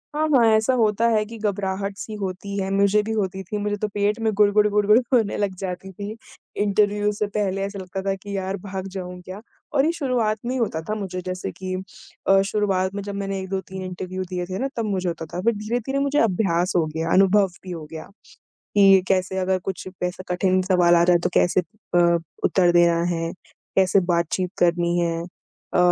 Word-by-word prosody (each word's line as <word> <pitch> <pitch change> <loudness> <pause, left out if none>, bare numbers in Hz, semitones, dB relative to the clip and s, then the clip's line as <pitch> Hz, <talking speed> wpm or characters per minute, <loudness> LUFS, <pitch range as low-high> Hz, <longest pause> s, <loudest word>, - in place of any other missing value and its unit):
हाँ, 310 +1 +1
हाँ। 260 -6 +5
ऐसा 220 +4 +2
होता 220 +1 +3
है 215 -2 +2
कि 225 +2 -9
घबराहट-सी 200 0 -3
होती 200 0 -5
है, 190 0 -1
मुझे 200 +1 +3
भी 225 - -4
होती 190 -3 -2
थी, 210 +3 -4
मुझे 205 0 -1
तो 210 +1 -1
पेट 205 +2 0
में 220 - +2
गुडगुड-गुडगुड 210 +1 +4
होने 225 -5 +2
लग 200 -2 -1
जाती 190 0 -5
थी। 205 +3 -6 0.5
इंटरव्यू 205 0 +2
से 210 0 -2
पहले 195 -1 -1
ऐसा 200 0 -6
लगता 190 +1 -5
था - - +2
कि 200 +1 -7
यार! 190 +1 -2
भाग 190 0 -6
जाऊँ 180 -1 -6
क्या? 185 +3 -9 0.3
और 280 0 +3
ये 325 - +3
शुरुआत 250 -9 0
में 245 - -1
ही - - -1
होता 215 -10 -1
था 215 - 0
मुझे, 190 -3 -4
जैसे 185 0 -4
कि 185 -1 -6 0.5
अ, 195 0 +6
शुरुआत 195 -2 0
में 200 - -3
जब 200 0 -5
मैंने 195 -1 -3
1-2-3 190 -1 -5
दिए 185 -1 -4
थे 185 +1 -5
ना 270 - 0
तब 230 - 0
मुझे 190 -3 -1
होता 165 -1 -5
था, 175 +3 -5
फिर 235 +3 +2
धीरे-धीरे 240 +6 -2
मुझे 280 +1 +1
अभ्यास 185 - +1
हो 170 -3 +3
गया, 160 +1 -3
अनुभव 195 +1 +5 0.2
भी 185 - -7
हो 165 -3 -6
गया, 160 -1 -7 0.7
कि 195 -2 +7
कैसे 190 0 +1
अगर 185 0 +1
कुछ 190 - -5 0.2
ऐसा 180 +1 -3
कठिन 185 +1 +2
सवाल 180 -2 +4
आ 170 - +5
जाए 175 0 +5
तो - - +2
कैसे 180 +1 +3
अ, 175 -3 +1 0.3
उत्तर 180 -2 +3
देना 170 -1 +4
है, 165 0 -2 0.4
कैसे 190 +1 +4
बातचीत 170 +2 0
करनी 175 0 +2
है, 165 -1 0 0.5
अ, - - +2
195 Hz, 200 wpm, -23 LUFS, 185-210 Hz, 0.7 s, कि